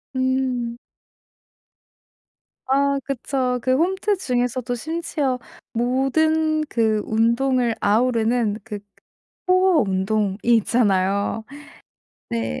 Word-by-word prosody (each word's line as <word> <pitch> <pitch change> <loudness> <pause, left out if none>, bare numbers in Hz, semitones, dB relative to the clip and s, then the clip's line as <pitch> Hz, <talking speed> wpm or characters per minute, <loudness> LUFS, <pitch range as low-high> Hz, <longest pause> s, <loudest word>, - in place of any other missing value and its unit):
음. 260 -2 -1 1.9
아 280 +1 +2
그쵸. 255 -1 -2
그 255 - +1
홈트 380 +5 +1
중에서도 245 -4 -1
심지어 300 -2 -2 0.3
모든 310 +6 +1
그 220 -5 +1
운동을 235 +2 +1
아우르는 225 0 +1
그 210 -2 -6 0.7
그 - - +6
코어 370 -4 +4
운동이 195 0 0
있잖아요. 205 -3 +2 0.9
네. 115 -9 -3
245 Hz, 170 characters per minute, -22 LUFS, 220-275 Hz, 1.9 s, 그